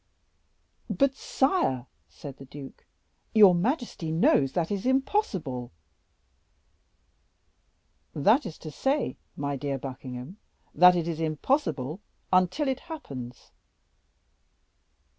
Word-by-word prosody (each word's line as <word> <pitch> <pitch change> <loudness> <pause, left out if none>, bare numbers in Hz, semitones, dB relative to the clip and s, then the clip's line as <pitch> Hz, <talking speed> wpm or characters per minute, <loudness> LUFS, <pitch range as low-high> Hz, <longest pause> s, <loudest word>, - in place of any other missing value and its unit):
"But, 275 -1 +2
sire," 265 - 0 0.2
said 140 -3 -10
the 135 - -11
duke, 135 0 -11 0.5
"your 205 -4 +8
majesty 210 - -1
knows 145 -4 +3
that 170 0 -1
it - - +2
is 200 +4 -3
impossible." 195 - 0 2.4
"That 215 - +3
is 160 - -8
to 155 - -5
say, 270 - -1 0.2
my 140 0 -2
dear 140 0 -2
Buckingham, 130 +4 -7 0.4
that 180 +3 +7
it 170 -1 -1
is 165 -2 -3
impossible 160 - -1 0.3
until 185 - +3
it 265 -1 0
happens." 135 - -9
170 Hz, 105 wpm, -27 LUFS, -, 2.4 s, your